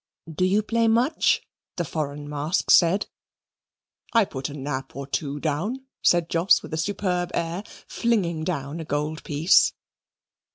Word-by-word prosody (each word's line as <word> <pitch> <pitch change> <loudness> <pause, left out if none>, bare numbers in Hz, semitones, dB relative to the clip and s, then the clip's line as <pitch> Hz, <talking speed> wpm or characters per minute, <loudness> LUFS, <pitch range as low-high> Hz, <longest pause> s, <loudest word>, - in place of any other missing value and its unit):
"Do 185 +4 +1
you 200 +3 +2
play 230 +1 +1
much?" 245 +8 +2 0.3
the 175 - -1
foreign 145 -1 -4
mask 150 +4 0
said. 180 +3 +5 1.1
"I 230 -3 +5
put 135 -4 -5
a 145 - -8
Nap 135 -1 -5
or 140 0 -5
two 145 +1 -3
down," 185 - -2 0.2
said 175 -2 +3
Jos 170 +2 +3
with - - -9
a - - -1
superb 180 0 -1
air, 170 +2 -2 0.3
flinging 185 -9 0
down 155 -2 -3
a - - -4
gold 150 +2 -2
piece. 155 +5 +4
165 Hz, 150 wpm, -25 LUFS, 145-195 Hz, 1.1 s, said